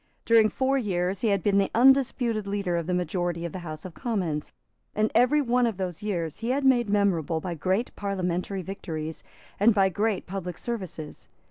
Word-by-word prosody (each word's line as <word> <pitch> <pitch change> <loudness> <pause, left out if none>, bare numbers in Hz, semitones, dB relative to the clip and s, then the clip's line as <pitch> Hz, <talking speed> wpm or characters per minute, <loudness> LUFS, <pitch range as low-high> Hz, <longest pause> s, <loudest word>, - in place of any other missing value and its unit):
During 225 -2 +5
four 270 +3 +1
years 185 -4 -1
he 230 - +1
had 200 -4 +1
been 200 -1 +3
the 195 - +1
undisputed 245 -4 +3
leader 200 -3 -1
of 170 -1 -2
the 180 - 0
majority 175 -1 -2
of 170 - -4
the 185 - -6
House 155 -2 -8
of 180 - -7
Commons; 180 - -2 0.4
and 215 +1 +1
every 255 +6 +4
one 245 -1 +2
of 220 -5 -3
those 185 -1 -4
years 170 -7 -3
he 230 +2 -3
had 275 +2 0
made 240 -4 +4
memorable 180 -6 +1
by 175 +2 -4
great 190 - -1
parliamentary 190 -1 -2
victories, 160 -4 -6 0.4
and 215 +2 +5
by 195 -1 +4
great 210 0 -1
public 180 -2 -5
services. 185 -10 -6
195 Hz, 190 wpm, -26 LUFS, 175-225 Hz, 0.4 s, During